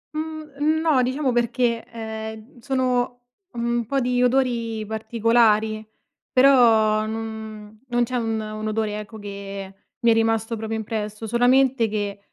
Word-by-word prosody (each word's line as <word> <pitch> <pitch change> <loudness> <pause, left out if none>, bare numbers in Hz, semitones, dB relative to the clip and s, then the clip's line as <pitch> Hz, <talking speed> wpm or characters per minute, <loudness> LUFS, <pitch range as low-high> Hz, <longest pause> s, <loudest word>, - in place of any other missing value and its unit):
Mhmm, 310 -1 -2
no 310 -6 +3
diciamo 260 +2 0
perché, 240 -1 +1
ehm, 220 +1 -7
sono, 250 -1 -1 0.3
mhmm, 235 0 -1
un 235 - -1
po' 275 +1 +1
di 250 0 +1
odori 240 -4 +1
particolari 220 0 +2 0.5
però 225 -5 +5
non 220 -1 -7
non 240 -1 +1
c'è 255 - -5
un 225 -2 -1
un 215 0 -5
odore 215 -1 -1
ecco 215 +1 -9
che 200 -1 -7 0.3
mi 235 - +3
è - - +6
rimasto 225 0 +1
proprio 220 0 -3
impresso, 215 0 -4
solamente 245 +1 +3
che 205 -1 -3
225 Hz, 135 wpm, -23 LUFS, 215-250 Hz, 0.5 s, è